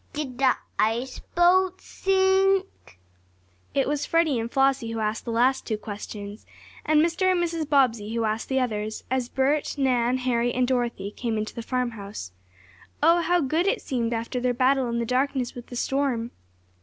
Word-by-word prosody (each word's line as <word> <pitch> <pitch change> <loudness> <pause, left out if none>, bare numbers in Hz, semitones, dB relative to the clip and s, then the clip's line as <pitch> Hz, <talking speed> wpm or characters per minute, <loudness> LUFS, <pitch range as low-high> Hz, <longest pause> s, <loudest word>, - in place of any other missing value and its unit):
"Did 265 -4 -5
the 265 -2 +4 0.2
ice 235 +4 0 0.2
boat 365 +2 +4
sink?" 385 - +1 0.8
It 275 - +2
was 290 0 -1
Freddie 325 -6 +2
and 230 +1 -3
Flossie 270 -4 +2
who 225 - -3
asked 215 0 -2
the 235 - -3
last 250 +3 +2
two 220 - -1
questions, 205 0 -8 0.4
and 310 +1 +4
Mr. 365 +3 +1
and 365 - +1
Mrs. 330 -3 -2
Bobbsey 235 -6 +2
who 230 - 0
asked 220 +1 -2
the 265 0 +2
others 215 -3 -2
as 255 -2 0
Bert, 285 +3 0
Nan, 250 -2 +2
Harry 245 -2 0
and 250 0 +2
Dorothy 240 -6 -1
came 230 0 -3
into 215 0 -3
the 235 - -5
farmhouse. 225 - -4 0.7
Oh, 335 +2 +5
how 350 +1 +2
good 315 +6 +1
it 460 +5 +1
seemed 240 -4 -1
after 230 +2 -2
their 245 0 0
battle 260 0 +2
in 235 - -1
the 235 - -1
darkness 255 0 0
with 245 -1 -10
the 245 - -9
storm! 245 -3 -1
255 Hz, 175 wpm, -25 LUFS, 230-295 Hz, 0.8 s, Oh